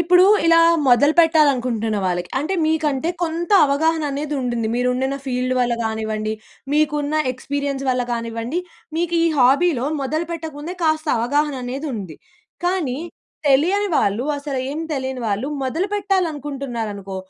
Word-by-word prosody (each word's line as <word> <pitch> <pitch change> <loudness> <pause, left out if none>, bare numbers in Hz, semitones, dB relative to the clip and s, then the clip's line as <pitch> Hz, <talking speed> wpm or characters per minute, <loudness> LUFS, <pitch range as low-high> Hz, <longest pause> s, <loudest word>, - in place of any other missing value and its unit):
ఇప్పుడు 360 +2 +5 0.2
ఇలా 330 0 +6 0.3
మొదలు 285 +5 +5
పెట్టాలనుకుంటున్న 255 -9 +2
వాళ్ళకి 175 -1 -1
అంటే 310 +8 -2
మీకంటే 315 0 0
కొంత 335 +2 -2 0.2
అవగాహన 320 +3 +1
అనేది 295 +1 -3
ఉందిండి. 240 -3 -1
మీరు 250 0 +1
ఉండిన 265 +2 -1
ఫీల్డ్ 255 0 -1
వల్ల 240 -1 +1
కానివ్వండి. 220 -1 -2 0.4
మీకున్న 300 0 +1 0.2
ఎక్స్పీరియన్స్ 275 +1 -3
వల్ల 250 0 +1
కానివ్వండి. 230 +6 -3 0.4
మీకు 340 0 -1
ఈ - - +3
హాబీలో 270 +1 +3 0.2
మొదలు 310 +5 -2
పెట్టకముందే 320 +1 -6
కాస్త 310 0 +1
అవగాహన 285 +5 +1
అనేది 270 +5 -4
ఉంది. 185 -7 -7 0.5
కానీ, 335 -9 0 0.5
తెలియని 360 +10 +3
వాళ్ళు 215 0 +1
అసలు 280 -2 -4
ఏమి 310 +3 -4
తెలియని 260 -2 -3
వాళ్ళు 210 +5 -1 0.2
మొదలుపెట్టాలనుకుంటున్నారనుకో, 280 - -2
280 Hz, 130 wpm, -21 LUFS, 245-320 Hz, 0.5 s, ఇలా